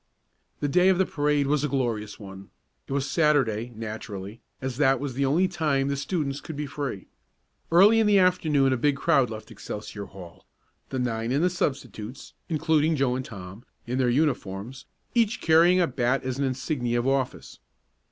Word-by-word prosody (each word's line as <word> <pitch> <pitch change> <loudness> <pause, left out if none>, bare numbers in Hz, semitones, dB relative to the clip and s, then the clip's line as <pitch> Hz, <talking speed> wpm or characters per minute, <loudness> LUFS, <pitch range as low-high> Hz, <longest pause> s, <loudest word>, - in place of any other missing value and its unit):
The 145 - +1
day 180 +6 +4
of 190 - +3
the 190 - +3
parade 145 -2 +1
was 145 +1 +1
a - - +2
glorious 120 -6 -2
one. 95 -2 -10 0.4
It - - -10
was 135 0 0
Saturday, 130 -8 +1
naturally, 110 -1 -7 0.2
as 130 -2 -4
that 135 -3 +3
was 140 -2 -4
the 135 +2 0
only 170 +7 +3
time 150 -6 0
the 140 - 0
students 145 -1 -2
could 160 - -8
be 150 +1 -3
free. 140 -8 -5 0.7
Early 200 +7 +6
in 220 - +3
the 205 -1 +5
afternoon 155 -8 +3
a - - 0
big 145 +3 +2
crowd 135 -2 +2
left 110 0 -8
Excelsior 105 -1 -7
Hall, 90 -3 -13 0.4
the 130 - -3
nine 115 -2 -1
and 140 +5 +1
the 180 - +3
substitutes, 130 - -4 0.2
including 160 0 +2
Joe 135 -3 +1
and 130 - -3
Tom, 100 -1 -10 0.2
in 125 +2 -2
their 125 -2 +2
uniforms, 125 -4 -1 0.3
each 230 0 +2
carrying 170 +3 +5
a 175 - +4
bat 125 -2 0
as 130 0 -3
an 140 - +1
insignia 130 -2 -1
of 120 +2 0
office. 135 -1 -2
135 Hz, 180 wpm, -26 LUFS, 120-150 Hz, 0.7 s, Early